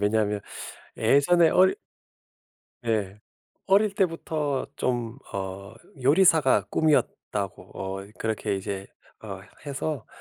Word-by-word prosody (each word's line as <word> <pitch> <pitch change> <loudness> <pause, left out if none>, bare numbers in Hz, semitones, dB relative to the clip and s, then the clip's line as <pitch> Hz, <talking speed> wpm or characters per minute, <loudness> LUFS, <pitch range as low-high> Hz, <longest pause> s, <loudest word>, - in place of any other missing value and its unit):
왜냐하면 105 0 +1 0.6
예전에 165 +4 +5
어릴 185 +1 +5 1.1
예. 105 -3 -1 0.5
어릴 200 +1 +4
때부터 160 -7 -1
좀 120 0 -1
어 100 +2 -5 0.3
요리사가 145 - +5
꿈이었다고 105 - 0
어 95 +1 -5
그렇게 110 -2 -1
이제 95 0 -4 0.4
어 - - -7 0.3
해서 140 -3 -3
120 Hz, 205 characters per minute, -26 LUFS, 100-160 Hz, 1.1 s, 예전에